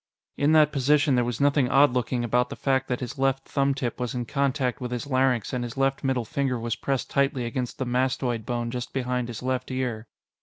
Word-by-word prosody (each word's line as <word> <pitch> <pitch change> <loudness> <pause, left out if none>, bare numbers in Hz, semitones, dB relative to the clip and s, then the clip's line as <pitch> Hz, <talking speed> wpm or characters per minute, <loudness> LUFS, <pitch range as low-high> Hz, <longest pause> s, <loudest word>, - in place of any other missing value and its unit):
In 145 +2 +2
that 155 -1 +5
position, 145 +1 +3
there 125 -1 +3
was 120 -1 -3
nothing 140 -2 +3
odd 140 -1 +5
looking 125 0 -1
about 125 +1 +1
the - - -6
fact 135 -1 0
that 125 0 -2
his 130 +3 -6
left 135 0 +1
thumbtip 135 -4 -1
was 125 +1 -3
in 120 -1 -2
contact 135 -1 -1
with 125 - -3
his 125 +1 -3
larynx 130 -4 +1
and 125 -1 -1
his 120 +1 -6
left 135 0 +1
middle 130 -3 0
finger 130 +1 -1
was 115 0 -2
pressed 135 +1 -2
tightly 140 -2 +1
against 120 +1 -3
the 130 - -2
mastoid 125 -2 0
bone 120 0 -2
just 125 -1 -5
behind 125 -2 -1
his 120 0 -7
left 130 0 -2
ear. 125 -4 -3
130 Hz, 220 wpm, -26 LUFS, 120-135 Hz, -, that